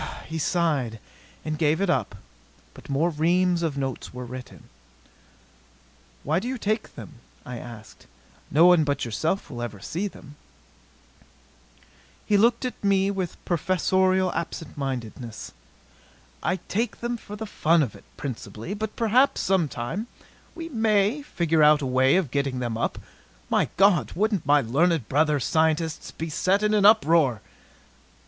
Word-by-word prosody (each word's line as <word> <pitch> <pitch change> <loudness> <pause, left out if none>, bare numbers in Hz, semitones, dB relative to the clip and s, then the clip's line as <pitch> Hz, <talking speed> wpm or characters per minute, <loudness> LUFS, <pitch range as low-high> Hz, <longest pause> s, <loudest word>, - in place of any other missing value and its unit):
He 160 +1 -4
sighed 145 -9 0 0.5
and 155 -1 -3
gave 155 0 +2
it 200 - +1
up. 175 - 0 0.6
But - - -14
more 155 +5 +1
reams 175 +3 +2
of 160 -4 -2
notes 135 -2 -4
were 125 0 -7
written. 125 +1 -9 1.6
"Why 155 +4 +1
do 225 - -5
you 260 +1 -2
take 215 0 -2
them?" - - -11 0.3
I 125 -1 -6
asked. 115 -3 -12 0.4
"No 160 +4 +5
one 175 -3 +6
but 140 -2 -1
yourself 155 - -2
will 120 -2 -6
ever 115 -4 -5
see 175 - -3
them." 150 -6 -13 1.9
He 210 - +2
looked 230 +4 +3
at 250 - -6
me 195 0 +3
with 190 -4 -4
professorial 185 +2 +1
absent 165 -1 -5
mindedness. 120 -4 -5 0.9
"I 180 - 0
take 225 +3 -2
them 240 0 -2
for 210 -3 -9
the 220 +1 -5
fun 165 -5 +2
of 120 - -4
it, - - -15
principally. 130 - -6
But 215 0 -4
perhaps, 240 +4 +3
sometime, 175 - -1 0.5
we 330 -1 -6
may 220 -1 +1
figure 165 - 0
out 150 -1 +5
a - - -1
way 130 +2 +3
of 180 -9 +1
getting 140 -2 -1
them 120 -2 -2
up. 115 - -2 0.5
My - - +2
God! 195 -4 +4
Wouldn't 200 -5 0
my 145 0 +5
learned 145 +3 +1
brother 150 +1 +2
scientists 160 +3 0
be 165 - -6
set 195 +6 +1
in 210 0 +2
an 205 -1 +5
uproar!" 165 - +4
165 Hz, 150 wpm, -25 LUFS, 140-200 Hz, 1.9 s, one